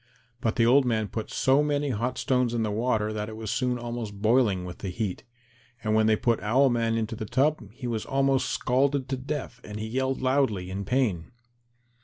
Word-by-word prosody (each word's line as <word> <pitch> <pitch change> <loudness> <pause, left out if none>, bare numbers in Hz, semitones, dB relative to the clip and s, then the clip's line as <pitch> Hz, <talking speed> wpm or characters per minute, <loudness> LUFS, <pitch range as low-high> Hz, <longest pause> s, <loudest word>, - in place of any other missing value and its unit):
But 110 -2 -1
the 115 - +3
old 135 +4 +6
man 110 -4 0
put 110 +3 -5
so 135 +2 +3
many 145 -1 0
hot 120 +3 -2
stones 125 -2 +1
in 115 - 0
the 105 - -1
water 110 -1 0
that 105 0 -3
it 110 - -8
was 110 -1 -4
soon 125 -1 0
almost 120 -4 -5
boiling 105 -4 +2
with 90 -1 -8
the 100 - -4
heat, 100 -1 -3 0.6
and 110 -1 0
when 110 0 +4
they 110 - +5
put 115 0 +1
Owl 130 +6 +3
man 115 -1 +1
into 115 0 -2
the 110 - -5
tub 130 -2 +1
he 125 +3 -9
was 115 -3 -2
almost 135 -1 +1
scalded 135 +1 +1
to 135 - 0
death 130 -2 -5
and 105 0 -7
he 110 - -3
yelled 130 +4 -1
loudly 130 -9 +1
in 100 +1 -4
pain. 115 -8 0
120 Hz, 210 wpm, -27 LUFS, 110-130 Hz, 0.6 s, old